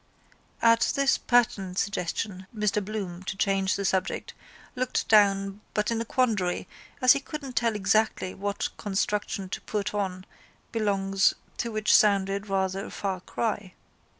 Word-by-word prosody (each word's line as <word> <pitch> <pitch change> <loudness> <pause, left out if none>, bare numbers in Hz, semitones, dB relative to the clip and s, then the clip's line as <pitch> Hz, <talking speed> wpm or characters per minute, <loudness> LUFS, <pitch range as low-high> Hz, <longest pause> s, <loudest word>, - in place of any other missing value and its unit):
At 230 0 +4
this 275 -1 +3
pertinent 220 -7 +1
suggestion 190 0 -2
Mr 210 -1 0
Bloom, 195 -4 -5
to 195 +1 -5
change 195 -1 +1
the 200 - -2
subject, 190 -1 -1 0.4
looked 255 0 -1
down 195 -1 +3
but 210 +1 +1
in 230 0 0
a - - -3
quandary, 210 -9 0 0.4
as 255 - +9
he 280 - -1
couldn't 275 -3 -7
tell 230 -1 +1
exactly 205 -1 +1
what 200 +1 -2
construction 205 0 -1
to - - -4
put 210 -1 -3
on 190 -2 -2 0.5
belongs 195 -3 +2 0.2
to 235 - -2
which 215 0 +3
sounded 200 0 +3
rather 195 +1 0
a - - -8
far 195 -2 -3
cry. 205 -2 -3
205 Hz, 145 wpm, -27 LUFS, 195-220 Hz, 0.5 s, as